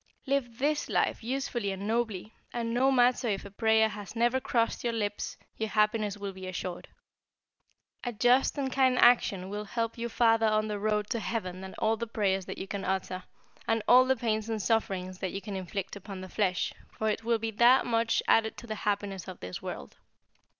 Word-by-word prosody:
Live 265 -4 -1
this 295 +3 0
life - - +1
usefully 245 -3 -2
and 195 +1 -5
nobly, 220 -2 -1 0.2
and 230 -1 -2
no 260 +3 +3
matter 250 -1 +3
if 200 -3 -1
a 200 - -9
prayer 220 +1 +3
has 210 -1 -8
never 240 +3 +2
crossed 230 -3 0
your 235 -1 0
lips 205 -2 -3 0.2
your 220 -1 -1
happiness 210 -1 +1
will 200 -1 -5
be 190 0 -8
assured. 180 -1 -5 1.2
A 245 - -2
just 245 +6 +3
and 270 -2 -1
kind 260 -1 +3
action 210 -7 +4
will 205 +2 -4
help 230 +2 -3
you 235 0 -2
farther 225 -1 +3
on 215 0 +2
the 210 -1 -2
road 210 0 0
to 235 - 0
heaven 185 -5 -3
than 190 0 -8
all 220 0 +1
the 235 +1 -4
prayers 195 -4 0
that - - -6
you - - -4
can 200 0 -4
utter, 185 -1 -2 0.4
and 225 -1 +1
all 250 +1 +8
the 265 0 +3
pains 220 -2 -1
and 220 -1 -1
sufferings 190 -3 -1
that 190 - -3
you 195 - -2
can 200 -1 -6
inflict 190 +1 -4
upon 195 -1 -8
the 185 - -8
flesh, 185 -3 0 0.2
for 220 - -3
it 215 +1 -1
will 230 0 +2
be 225 0 -3
that 240 +4 +5
much 230 -1 +1
added 220 -1 +3
to - - -9
the 220 - -4
happiness 200 -2 -2
of 185 - -8
this 90 0 -6
world. - - -7
220 Hz, 205 wpm, -29 LUFS, 200-235 Hz, 1.2 s, all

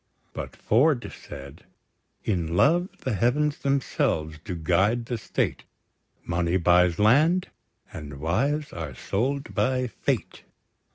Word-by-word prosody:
But - - -6
Ford 130 +3 +2
said: 70 0 -11 0.6
In 85 -5 -1
love, 175 - +4
the 130 - -2
heavens 140 +9 +1
themselves 80 - 0
do 90 - -4
guide 95 +8 +1
the 120 -1 -3
State; - - -1 0.6
Money 85 +1 +1
buys 90 -1 +4
land, 150 - +4 0.4
and 70 -2 -8
wives 140 - 0
are 80 -6 -6
sold 135 - -2
by 130 0 +1
fate! 120 - -3
110 Hz, 115 wpm, -26 LUFS, 85-140 Hz, 0.6 s, love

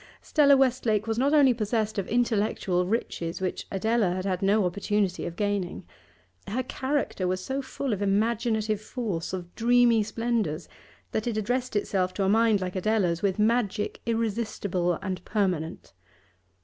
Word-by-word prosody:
Stella 285 -3 +4
Westlake 245 -5 +2
was 225 0 -1
not 275 +3 +3
only 285 -4 +6
possessed 215 -1 -1
of 190 - -3
intellectual 210 -6 +1
riches 175 -6 -2
which 185 -1 -3
Adela 210 -1 +1
had 185 +1 -3
had 185 -2 -1
no 200 +1 +3
opportunity 200 +1 -1
of 170 - -6
gaining; 205 -3 -2 0.6
her 250 +6 -1
character 260 -7 -2
was 185 0 -2
so 270 +1 -2
full 265 -1 -3
of 205 - -3
imaginative 215 +1 +1
force, 210 -7 -4
of 175 -2 -6
dreamy 240 -1 +4
splendours, 220 -7 -2 0.4
that 220 +2 -2
it 230 -2 -1
addressed 245 +3 -1
itself 185 -3 0
to 200 - 0
a 190 - +2
mind 220 -1 +3
like 185 0 -4
Adela's 185 -3 +1
with 195 -2 0
magic 215 -1 0
irresistible 210 -5 -1
and 185 -1 -4
permanent. 185 -7 -2
210 Hz, 150 wpm, -27 LUFS, 185-235 Hz, 0.6 s, only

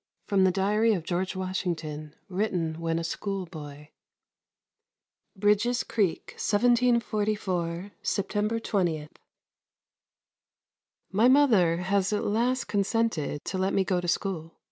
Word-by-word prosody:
V - - -30
FROM 195 -2 +4
THE 185 - +4
DIARY 210 +4 +2
OF 180 -5 -2
GEORGE 180 +3 -2
WASHINGTON 165 -5 -4
WRITTEN 180 -5 -1
WHEN 165 0 -1
A 165 - -2
SCHOOLBOY 160 -6 -5 1.5
Bridges 210 +5 +2
Creek, 200 -7 -1
1744, 210 -6 +1
September 210 +3 -1
20. 175 -9 -1 2.0
My 215 +5 +4
mother 225 - +5
has 190 +2 0
at 210 - 0
last 240 +4 +1
consented 200 -8 -1
to 190 - -3
let 190 +1 0
me 195 - +3
go 185 -2 0
to 175 - -5
school. 170 -2 -2
190 Hz, 115 wpm, -27 LUFS, 170-210 Hz, 2.0 s, mother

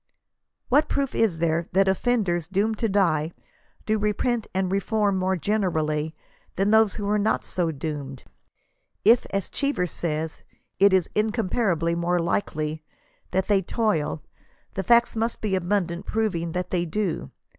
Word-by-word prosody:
What 290 +5 +3
proof 275 -2 -1
is 215 -8 +1
there 165 0 0
that 195 +1 +4
ojQTenders 190 -4 0
doomed 210 +3 0
to 225 - +1
die, 170 -5 +1 0.5
do 215 0 +1
repent 215 +2 0
and 185 0 -1
reform 200 0 +1
more 185 0 +1
generally 160 -5 -1 0.4
than 195 +2 +1
those 220 -2 +4
who 205 - -4
are 210 +1 +2
not 215 +2 +1
so 175 -2 -1
doomed? 140 -3 -5 0.8
If, 230 +3 +5
as 195 -1 -2
Cheever 280 -10 0
says, 160 -2 -3 0.4
it 200 +1 +6
is 185 -3 +3
" - - -35
incomparably 190 -6 0
more 170 +1 0
likely" 155 -3 -1 0.5
that 190 +1 0
they 200 -2 +3
toill, 170 - -1 0.5
the 195 - -2
facts 235 +5 +4
must 225 +1 -1
be 210 -3 -2
abundant 185 -1 -1
proving 180 -7 -1
that 180 0 -3
they 175 -2 +1
do. 175 0 -2
190 Hz, 150 wpm, -25 LUFS, 170-215 Hz, 0.8 s, it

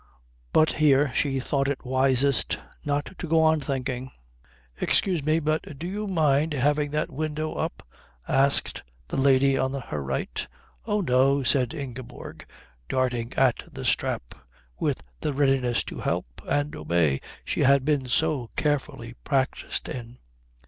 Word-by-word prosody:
But 155 - +4
here 145 -3 +3
she 135 0 0
thought 135 +1 0
it 140 -2 -3
wisest 130 0 +2 0.3
not 145 0 -1
to 175 - -4
go 160 +1 +3
on 160 -1 +3
thinking. 130 -2 -3 0.7
"Excuse 180 -6 +1
me, 155 +2 +2
but 155 -2 -2
do 165 - -6
you 205 +4 -3
mind 155 -4 +2
having 145 +2 +1
that 150 +1 -2
window 155 +2 -3
up?" - - -4 0.4
asked 135 +1 +4 0.3
the - - -4
lady 135 0 +4
on 130 0 0
her 125 - -4
right. 65 -1 -3 0.4
"Oh, 210 -1 +1
no," 135 -2 +3
said 130 +3 +2
Ingeborg, 130 -4 -8 0.4
darting 125 -2 0
at 130 -3 +2
the - - -7
strap - - 0 0.5
with - - 0 0.2
the 150 - -2
readiness 135 -3 +2
to - - -7
help - - -3
and 145 +1 0
obey 75 -3 +1 0.2
she - - -2
had 140 0 +4
been 145 -4 +1
so 135 -2 +1
carefully 135 -5 -1
practised 135 -2 -1
in. 120 0 -7
140 Hz, 140 wpm, -26 LUFS, 130-150 Hz, 0.7 s, But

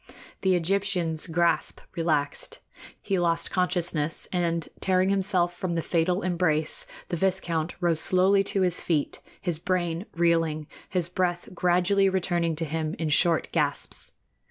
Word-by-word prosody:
The 190 -1 +3
Egyptian's 180 -2 +1
grasp 170 +1 0 0.2
relaxed; 155 -4 -1 0.4
he 195 -2 -1
lost 170 -1 0
consciousness, 175 -4 0
and, 170 -2 0
tearing 185 0 +2
himself 185 -3 +1
from 175 -1 -3
the 165 - -1
fatal 180 +3 0
embrace, 165 -4 0 0.2
the 175 - -2
viscount 170 -3 -1
rose 170 -3 +2
slowly 190 +3 +4
to 195 - 0
his 180 -1 +1
feet, 155 -4 -1 0.2
his 175 -4 0
brain 175 0 -1
reeling, 165 -2 +1 0.2
his 180 -3 0
breath 175 -1 -2
gradually 180 +3 +3
returning 175 -3 0
to 165 +1 -2
him 155 0 -3
in 160 -2 -2
short 165 +1 +3
gasps. 150 -4 -1
175 Hz, 135 wpm, -26 LUFS, 165-185 Hz, 0.4 s, slowly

